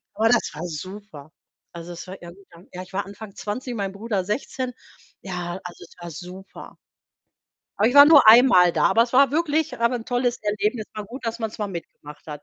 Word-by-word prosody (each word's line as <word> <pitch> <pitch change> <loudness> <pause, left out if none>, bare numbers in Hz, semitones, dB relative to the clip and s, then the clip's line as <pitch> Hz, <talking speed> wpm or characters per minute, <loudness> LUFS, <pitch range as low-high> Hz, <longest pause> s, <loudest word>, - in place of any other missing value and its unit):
Aber 220 +2 +2
das 240 0 +2
war 155 - -7
super. 170 -2 -9 0.4
Also, 170 +1 -9
es 170 +2 -10
war 190 0 -10
irgendwann 175 0 -15
ja 180 - -6
ich 185 +1 -13
war 200 +1 -2
Anfang 200 0 -11
20, 240 +4 -5
mein 200 -3 -3
Bruder 200 -1 -3
16. 250 +4 -4 0.5
Ja, 180 -1 -5
also, 180 -1 -10
es - - -21
war 175 -1 -8
super. 180 +4 -11 1.0
Aber 215 - +4
ich 245 - -3
war 285 0 +10
nur 290 -6 +7
einmal 215 -7 +7
da. - - 0
Aber 230 - +4
es 235 - -4
war 275 +2 +5
wirklich 315 0 -1
aber 235 +2 +1
'n 235 -2 -5
tolles 245 0 -1
Erlebnis, 210 +2 -2
war 215 - -6
gut, 245 +4 -10
dass 230 +1 -3
man's 220 -1 -5
mal 210 - -2
mitgemacht 150 -4 -10
hat. 150 -2 -8
205 Hz, 205 wpm, -23 LUFS, 180-240 Hz, 1.0 s, war